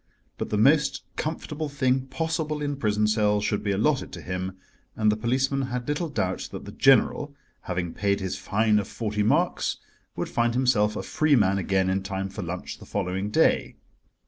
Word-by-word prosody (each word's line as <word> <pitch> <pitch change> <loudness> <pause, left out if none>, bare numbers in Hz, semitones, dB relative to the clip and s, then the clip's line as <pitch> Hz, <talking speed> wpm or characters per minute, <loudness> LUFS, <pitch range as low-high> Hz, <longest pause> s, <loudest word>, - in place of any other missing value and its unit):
But - - -3
the 105 - 0
most 140 +5 +3
comfortable 155 -1 -3
thing 130 -2 +1
possible 155 +2 -2
in 145 -1 -2
prison 105 -4 +1
cells 105 -1 +2
should 105 - 0
be 105 - -1
allotted 130 +9 +1
to - - -7
him, 90 +1 -4 0.4
and 110 -1 +3
the - - +1
policeman 130 +4 0
had 125 -1 -4
little 150 +3 -1
doubt 95 -10 -2
that - - -7
the - - -8
General, 140 +2 +3 0.3
having 90 -2 -2
paid 100 0 0
his 95 -1 -3
fine 110 0 +2
of 100 - -3
forty 105 -2 -2
marks, 105 - +1 0.4
would - - -2
find 120 0 0
himself 115 -5 +2
a - - -3
free 155 -2 +2
man 100 -4 +3
again 95 0 +1
in 95 +1 +1
time 95 0 -3
for 100 +2 -6
lunch 90 0 -5
the - - -12
following 95 0 -2
day. - - +2
110 Hz, 185 wpm, -26 LUFS, 100-135 Hz, 0.4 s, most